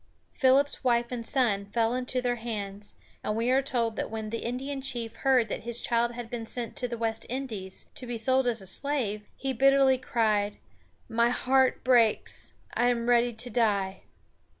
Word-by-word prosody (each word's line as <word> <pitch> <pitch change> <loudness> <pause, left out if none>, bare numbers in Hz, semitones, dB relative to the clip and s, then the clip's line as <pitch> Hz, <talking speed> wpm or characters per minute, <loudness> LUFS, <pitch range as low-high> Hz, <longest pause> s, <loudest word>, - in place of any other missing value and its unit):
Philip's 270 +2 +2
wife 240 -1 +2
and 240 -2 -3
son 225 -6 +1
fell 225 +2 +1
into 255 0 -1
their 245 -1 0
hands, 205 -3 -5 0.3
and 210 - -1
we 230 +3 +1
are 265 +1 +4
told 235 -5 -1
that - - -2
when 220 -1 -5
the 230 - -2
Indian 270 +4 -4
chief 240 -4 -2
heard 260 -4 +3
that - - -3
his 235 0 -2
child 235 0 +1
had 240 -1 -6
been 230 -1 -5
sent 235 -2 -3
to 250 - -1
the 235 -1 -5
West 225 -1 -1
Indies, 225 -8 -4
to 255 - -6
be 240 -1 -3
sold 260 +2 +2
as 230 -4 +1
a - - -11
slave, 215 0 -1
he 270 -1 -3
bitterly 270 +1 +4
cried: 215 -4 0 0.5
"My 235 +1 +2
heart 260 +1 +2
breaks! 235 -4 +2 0.2
I 240 +1 +2
am 235 -1 0
ready 240 0 +4
to 235 +2 -2
die." 200 -5 +1
235 Hz, 185 wpm, -28 LUFS, 225-255 Hz, 0.5 s, are